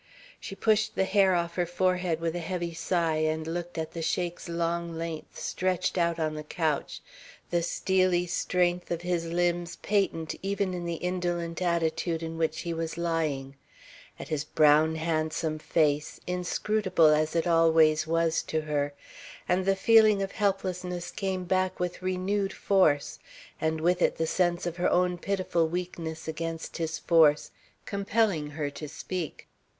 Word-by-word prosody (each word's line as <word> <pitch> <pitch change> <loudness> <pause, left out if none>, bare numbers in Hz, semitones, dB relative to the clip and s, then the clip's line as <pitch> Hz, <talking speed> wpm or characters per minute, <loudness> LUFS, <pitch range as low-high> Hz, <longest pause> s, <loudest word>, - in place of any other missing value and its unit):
She 195 - -7
pushed 220 +1 +1
the - - +2
hair 190 -1 +3
off 170 -1 -1
her 175 -1 -1
forehead 180 -1 0
with 165 0 -1
a - - -2
heavy 170 0 -3
sigh 165 -1 0
and 155 0 0
looked 175 +1 -4
at 160 0 -3
the 165 - -5
Sheik's 175 +1 -2
long 170 0 -2
length 165 -1 -6
stretched 185 -1 -1
out 170 -2 +1
on 155 -2 -1
the 155 0 -6
couch, 155 -1 -2 0.5
the 175 -1 +2
steely 185 0 +1
strength 180 0 0
of 170 0 -3
his 175 -1 -1
limbs 175 0 0
patent 195 -6 0
even 195 -1 -1
in 175 -1 -4
the 170 0 -2
indolent 175 -1 -2
attitude 170 -1 0
in 165 0 -5
which 160 -1 0
he 170 - -3
was 165 0 -4
lying, 155 -5 -1 0.6
at - - -8
his 150 -2 -1
brown 155 +1 +4
handsome 155 -1 -1
face, 150 -2 0
inscrutable 180 -1 +2
as 155 +1 +1
it 165 - +2
always 160 -2 +4
was 165 0 +1
to 160 - -2
her, 145 -2 -2 0.5
and 185 +1 +1
the 195 - +4
feeling 215 -1 +5
of 195 - -4
helplessness 185 -3 -2
came 190 -2 -2
back 185 +1 0
with 180 0 -3
renewed 185 +2 -1
force 155 -8 +2 0.4
and 160 0 0
with 175 +2 +1
it - - +3
the 165 - -1
sense 175 +1 +1
of 175 0 -3
her 180 - +2
own 180 0 +2
pitiful 185 -4 0
weakness 165 -2 -5
against 165 +1 -4
his 160 -1 -2
force, 155 -3 +4 0.3
compelling 200 -6 0
her 145 -1 -3
to 145 +1 -7
speak. 170 +1 -5
170 Hz, 160 wpm, -28 LUFS, 160-180 Hz, 0.6 s, feeling